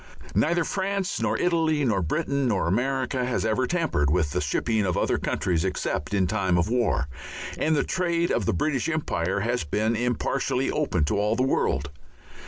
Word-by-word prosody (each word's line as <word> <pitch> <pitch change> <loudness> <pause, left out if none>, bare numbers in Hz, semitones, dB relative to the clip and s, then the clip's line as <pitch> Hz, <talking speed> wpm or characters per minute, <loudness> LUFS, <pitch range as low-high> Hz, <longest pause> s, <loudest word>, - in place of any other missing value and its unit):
Neither 170 +2 +2
France 195 +1 -2
nor - - +1
Italy 160 -4 +1
nor 105 -6 +1
Britain 140 - 0
nor 100 -5 +1
America 130 +5 0
has 125 -2 -1
ever 110 +4 +1
tampered 160 - +1
with 80 -2 +1
the - - -1
shipping 110 -2 0
of 90 -3 0
other - - +1
countries 85 -3 0
except 90 -5 -2
in 95 -2 +3
time 95 -2 +1
of 85 +4 +1
war, 115 - +1 0.5
and 160 0 +1
the 145 - +2
trade 170 -2 0
of 105 -6 0
the - - +3
British 140 - 0
Empire 100 - -1
has 120 +3 0
been 110 +9 0
impartially 120 +1 0
open - - 0
to 100 +8 0
all 105 +2 +1
the 130 - +1
world. 70 - 0
120 Hz, 180 wpm, -25 LUFS, 95-150 Hz, 0.5 s, in